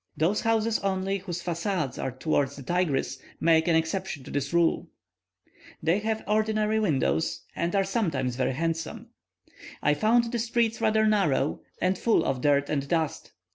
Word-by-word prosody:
Those 170 +8 +1
houses 225 0 +1
only 195 0 -1
whose 175 -2 -5
facades 170 -4 -2
are - - -1
towards 140 +1 0
the 140 - -9
Tigris 150 -4 0 0.2
make 160 0 +3
an 170 - +4
exception 160 -2 -1
to - - -10
this 140 -1 -2
rule; 170 -1 +2 0.9
they 165 +5 +2
have 220 +1 -2
ordinary 215 0 +1
windows, 160 - 0
and 170 +3 -1
are 195 - +3
sometimes 160 - -1
very 130 +1 0
handsome. 165 +3 -3 0.7
I 150 - +2
found 230 +8 +2
the 240 - -1
streets 230 0 0
rather 220 -1 +3
narrow, 195 -10 +1 0.2
and 185 0 +1
full 230 - +2
of 130 -2 -1
dirt 145 0 +3
and 140 -2 -2
dust. 160 -3 -2
175 Hz, 160 wpm, -27 LUFS, 145-215 Hz, 0.9 s, an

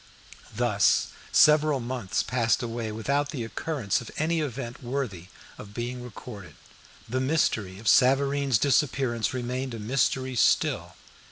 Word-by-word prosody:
Thus, - - +2 0.2
several 150 -2 +5
months 120 -5 -2
passed 120 -1 +1
away 115 -1 -4
without 140 +7 -1
the 130 -6 -4
occurrence 130 0 -2
of 115 - -9
any 160 +2 +1
event 130 -3 -5
worthy 120 -9 -4 0.3
of 105 0 -11
being 125 +1 -4
recorded. 105 - -10 0.5
The 130 +3 -1
mystery 115 -9 0
of 110 +2 -9
Savareen's 135 +2 +4
disappearance 130 -4 +1
remained 125 0 -3
a - - -7
mystery 130 +3 0
still. - - +2
125 Hz, 125 wpm, -27 LUFS, 115-140 Hz, 0.5 s, several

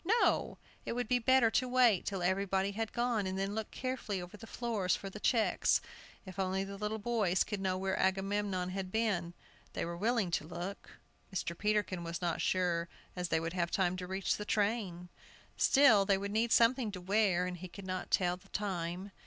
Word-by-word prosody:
No, - - +1 0.3
it - - -3
would 245 0 -2
be 250 +1 +2
better 245 -1 +4
to 255 - +1
wait 245 -6 +4
till 195 -3 -2
everybody 195 +1 +1
had 220 +2 -3
gone, 235 -4 0
and 190 0 -3
then 195 +1 -1
look 220 0 -3
carefully 255 -6 -3
over 180 +2 -8
the 225 +2 -11
floors 220 -7 0
for 195 - -7
the 210 - -8
checks; 225 +1 +2 0.5
if 185 0 -9
only 190 0 0
the 200 0 -7
little 210 +2 -3
boys 210 -5 +1
could 205 -2 -4
know 185 -1 0
where 190 0 -1
Agamemnon 195 -1 0
had 190 -1 -4
been, 190 -6 0 0.4
they - - -2
were 170 0 -4
willing 210 0 0
to 155 - -1
look. 175 +4 -7 0.3
Mr. 180 -3 -3
Peterkin 205 -3 0
was 170 0 -4
not 175 -2 -1
sure 175 -2 +1 0.3
as 180 -1 -3
they 160 - +2
would 165 +1 -3
have 170 -2 0
time 185 -1 +1
to 180 -1 -5
reach 190 0 -1
the 210 - -4
train. 205 -5 -1 0.5
Still, 255 -8 +6
they 195 0 +3
would 200 +1 -4
need 225 +2 +1
something 235 -1 +4
to 185 - -5
wear, 190 -1 +2
and 180 0 -4
he 185 +2 -7
could 195 +2 -10
not 185 0 -4
tell 180 -1 +2
the 195 +2 -21
time. 185 -1 -3
195 Hz, 200 wpm, -33 LUFS, 180-215 Hz, 0.5 s, Still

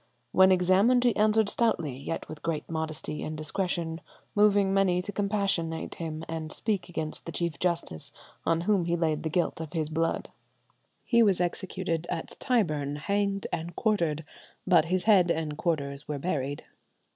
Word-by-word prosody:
When 190 0 +6
examined 190 +7 +4
he 240 -2 +3
answered 215 0 +3
stoutly, 170 - +1
yet 140 +5 -5
with 155 -1 -9
great 165 -2 -2
modesty 160 -2 -3
and 155 0 -4
discretion, 165 0 -2 0.3
moving 205 -2 +4
many 190 -2 +3
to 185 +3 -4
compassionate 195 -6 -1
him 160 -1 -5
and 160 -1 -4
speak 210 -5 -2
against 160 -2 -4
the - - -3
Chief 170 -2 -2
Justice, 170 - -1 0.3
on 165 0 +1
whom 190 -1 +2
he 170 0 +1
laid 160 -3 0
the 160 - -2
guilt 175 -1 0
of 160 0 -7
his 155 -3 -1
blood." 165 +1 -1 0.7
He 235 -2 +4
was 200 -6 +4
executed 175 -1 -2
at - - -4
Tyburn, 155 - +1
hanged 200 +5 -1
and 170 0 -3
quartered, 170 -9 0 0.4
but 175 -4 +5
his 180 +2 0
head 195 -5 +5
and 160 -2 -1
quarters 145 -3 -2
were 150 - -2
buried. 145 -2 -2
170 Hz, 160 wpm, -28 LUFS, 155-195 Hz, 0.7 s, When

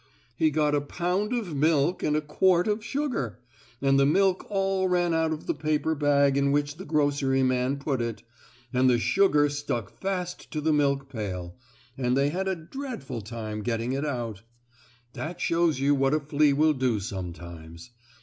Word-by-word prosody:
"He 155 - +3
got 150 -1 +1
a 145 - +2
pound 180 +8 -1
of 220 -11 -2
milk 155 +3 +2
and 150 - +1
a 155 - +1
quart 175 +5 +2
of 210 +1 0
sugar, 245 - -2 0.5
and 135 0 +4
the 135 - +5
milk 190 +4 +2
all 195 -2 +1
ran 175 -2 +1
out 160 0 +1
of 155 0 -4
the - - 0
paper 155 +1 0
bag 140 -2 +3
in 140 0 +2
which 145 +1 0
the 190 - -8
groceryman 135 -3 +1
put 140 -3 -2
it, 115 -2 -4 0.5
and 130 +1 +4
the 120 - +4
sugar 150 +2 +3
stuck 145 -7 -4
fast 180 -2 -3
to 155 - -3
the 155 +1 +1
milk 140 -2 +1
pail, 95 -8 -5 0.4
and 125 0 +1
they 140 +1 +3
had 190 +3 -2
a 190 - 0
dreadful 165 - -6
time 110 0 -5
getting 115 +2 -2
it 135 +2 -1
out. 120 -8 -3 0.7
That 170 +3 -6
shows 165 -4 +1
you 140 +1 +3
what 135 +1 +2
a - - +2
flea 145 0 +2
will 155 +2 +3
do 130 -5 0
sometimes. 85 -2 -8
145 Hz, 180 wpm, -27 LUFS, 130-165 Hz, 0.7 s, the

